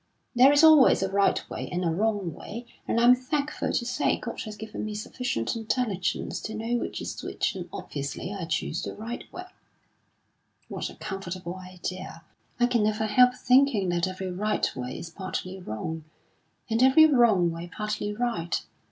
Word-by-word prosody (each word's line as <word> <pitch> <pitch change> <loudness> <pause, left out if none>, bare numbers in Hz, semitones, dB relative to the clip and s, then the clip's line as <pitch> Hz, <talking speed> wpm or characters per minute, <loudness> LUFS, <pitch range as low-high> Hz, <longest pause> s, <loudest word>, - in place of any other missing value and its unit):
"There 255 +3 +7
is 290 +2 +5
always 310 -10 +7
a 190 - -1
right 200 0 +2
way - - -5
and 180 0 -1
a 165 - +2
wrong 200 -1 0
way, 235 +10 -8 0.2
and, 230 - +1
I'm 240 +1 +7
thankful 285 +4 -2
to 240 - 0
say, 250 0 +1
God 230 - -6
has 215 -1 -7
given 220 0 -6
me 215 0 -4
sufficient 210 - -2
intelligence 220 -4 -1
to 220 - -5
know 225 +2 -1
which - - -4
is - - -5
which; - - -1
and - - -7
obviously 140 +6 -5
I 195 -4 -4
choose 160 0 -2
the - - -5
right 230 +3 -7
way." 365 - -7 1.2
"What - - -4
a - - -12
comfortable 185 -3 -5
idea! 185 -2 -7 0.4
I 245 - +5
can 245 -2 +2
never 215 +1 +1
help 250 +4 +5
thinking 255 -7 +3
that 175 +1 +1
every 185 0 -4
right 210 +4 0
way 125 0 -5
is 165 - -8
partly 185 +1 -5
wrong, 160 +2 -5 0.6
and 225 0 0
every 265 +5 +7
wrong 230 - +4
way 165 +1 -7
partly 210 -1 -3
right. 210 -7 -1
210 Hz, 175 wpm, -27 LUFS, 180-245 Hz, 1.2 s, There